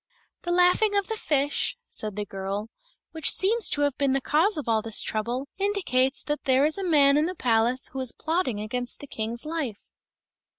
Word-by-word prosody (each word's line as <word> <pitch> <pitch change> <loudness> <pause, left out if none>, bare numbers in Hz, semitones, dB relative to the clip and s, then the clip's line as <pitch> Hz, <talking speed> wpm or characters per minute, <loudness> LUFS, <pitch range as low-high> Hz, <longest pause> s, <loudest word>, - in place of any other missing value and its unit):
"The 345 - -3
laughing 360 +4 +4
of 400 - +1
the 445 - -1
fish," 290 - 0
said 215 -2 -5
the 210 0 -3
girl, 195 +2 -5 0.4
"which 320 -2 0
seems 435 +3 +2
to 290 - 0
have 285 -2 +1
been 275 -2 +2
the 270 - +2
cause 320 +9 +1
of 295 - -5
all 220 -1 +2
this 225 0 +2
trouble, 240 +5 -3
indicates 355 -10 0
that 295 0 -3
there 265 +1 +4
is 310 +5 +1
a - - -2
man 290 -5 +4
in 305 +2 +2
the 365 - -4
palace 240 0 +1
who 265 - -6
is 260 -2 0
plotting 315 - -2
against 245 +3 -2
the - - -8
King's 230 0 -4
life." 300 -10 -5
275 Hz, 200 wpm, -26 LUFS, 235-330 Hz, 0.4 s, laughing